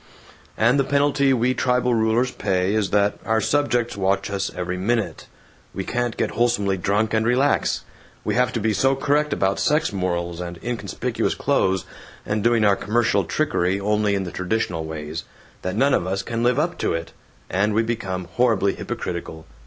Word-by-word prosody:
And 120 +5 +3
the - - +4
penalty 140 0 +2
we 125 0 +2
tribal 125 -1 +1
rulers 115 +3 +2
pay 95 -1 0
is 105 -3 +1
that 100 0 +2
our 110 0 +1
subjects 120 -1 +1
watch 95 0 0
us 100 0 -1
every 90 0 -3
minute. 110 +5 -1 0.5
We 95 - -2
can't 120 +2 -2
get - - 0
wholesomely 115 -5 +1
drunk 105 +4 0
and 110 0 +2
relax. 125 +5 +2 0.4
We - - -1
have 125 +1 +2
to 115 - -1
be 110 0 +1
so 135 +7 +2
correct 145 +2 +1
about 95 -5 +1
sex 150 -5 +1
morals, 85 -2 -2
and 85 -1 -6
inconspicuous 120 -1 -2
clothes, 95 -1 +1 0.4
and 105 0 -1
doing 115 -2 +3
our 100 -1 +5
commercial 115 +4 +1
trickery 100 -11 0
only 105 0 +1
in 95 - -1
the 90 - -6
traditional 90 -4 -2
ways, 80 0 -5 0.4
that 95 +1 -3
none 135 +5 +3
of 90 - +1
us 95 +1 -1
can 115 -1 -3
live 125 +2 +2
up 170 +4 0
to - - 0
it, 85 0 -4 0.4
and 105 +3 +1
we 115 - +3
become 95 -6 -3
horribly 110 -5 +2
hypocritical. 80 -2 -5
110 Hz, 175 wpm, -23 LUFS, 95-120 Hz, 0.5 s, our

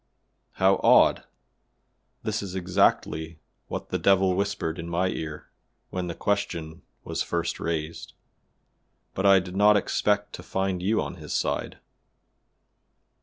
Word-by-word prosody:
"How 95 +1 +3
odd! - - +5 1.0
This 110 -1 -1
is 95 -2 -6
exactly 90 -3 +1 0.3
what - - -5
the - - 0
Devil 95 -1 +4
whispered 95 -4 -2
in 85 +1 -6
my 90 +2 +1
ear 80 -4 -6 0.4
when 90 -1 -3
the 85 - -5
question 85 -6 -2 0.2
was - - -3
first 85 0 -2
raised, 80 -1 -4 1.0
but 95 +1 +1
I 100 -1 +7
did 90 0 -7
not 105 +1 +6
expect 105 +1 0
to - - -7
find 95 -2 -2
you 105 +4 +1
on 90 - -7
his 75 -3 -7
side." - - -1
95 Hz, 130 wpm, -26 LUFS, 85-100 Hz, 1.0 s, I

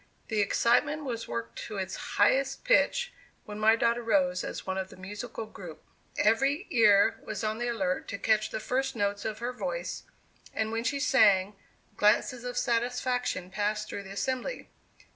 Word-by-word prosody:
The 215 -2 +1
excitement 290 +9 +2
was 235 -4 -4
worked 115 0 -5
to 210 - -6
its 190 -1 -3 0.2
highest 270 +6 +3
pitch - - +2 0.3
when 210 0 -7
my 220 +1 +5
daughter 235 +1 +1
rose 190 -5 +1
as - - -6
one 190 0 -2
of 190 0 -4
the - - -13
musical 205 +5 -6
group. 180 -7 -11 0.3
Every 270 +7 +2
ear 210 -4 +5
was 210 +1 -5
on 215 +1 -1
the 240 - -1
alert 190 -6 -1
to 200 - -4
catch 215 +1 +2
the - - -4
first 265 +4 -1
notes 200 -1 -1
of 215 -1 -3
her 240 +2 -3
voice, - - -4 0.5
and 220 0 -1
when 225 0 -2
she 280 +1 0
sang, 205 -8 +4 0.4
glances 235 +4 +2
of 245 0 -4
satisfaction 245 -5 -1
passed 210 +2 -1
through 200 - -5
the 195 - -11
assembly. 260 - -3
220 Hz, 170 wpm, -29 LUFS, 200-250 Hz, 0.5 s, my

